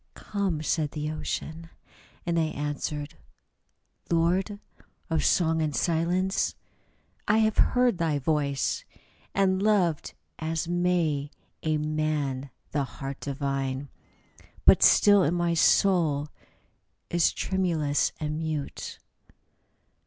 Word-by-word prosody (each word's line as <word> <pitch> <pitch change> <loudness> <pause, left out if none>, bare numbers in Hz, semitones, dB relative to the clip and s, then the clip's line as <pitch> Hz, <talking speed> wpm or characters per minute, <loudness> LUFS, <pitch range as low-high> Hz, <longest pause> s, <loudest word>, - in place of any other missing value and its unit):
" - - -45
Come," 190 -7 -2
said 155 -1 0
the 150 0 -3
Ocean: 155 +1 -5 0.6
and 170 -1 +1
I 160 - +2
answered: 145 0 -4 0.5
" - - -42
Lord 180 +5 +1 0.5
Of 160 - +1
song 160 -2 +2
and 150 -3 -1
silence, 175 +3 0 0.7
I 215 - +4
have 220 -1 +2
heard 245 -6 +3
thy 160 -3 +1
voice, 140 -1 0 0.5
And 190 -1 +2
loved 195 -7 +1 0.2
as 160 +1 -2
may 170 -5 0 0.3
a 155 -1 0
man 150 -3 -1 0.2
the 145 -2 0
heart 135 +1 -7
divine; 135 -1 -3 0.8
But - - +7
still 205 -6 +6
my 175 0 +1
soul 160 -4 +3 0.8
is 170 -1 +3
tremulous 165 -6 0
and 155 0 -3
mute." 155 -3 -4
160 Hz, 110 wpm, -27 LUFS, 145-175 Hz, 0.8 s, But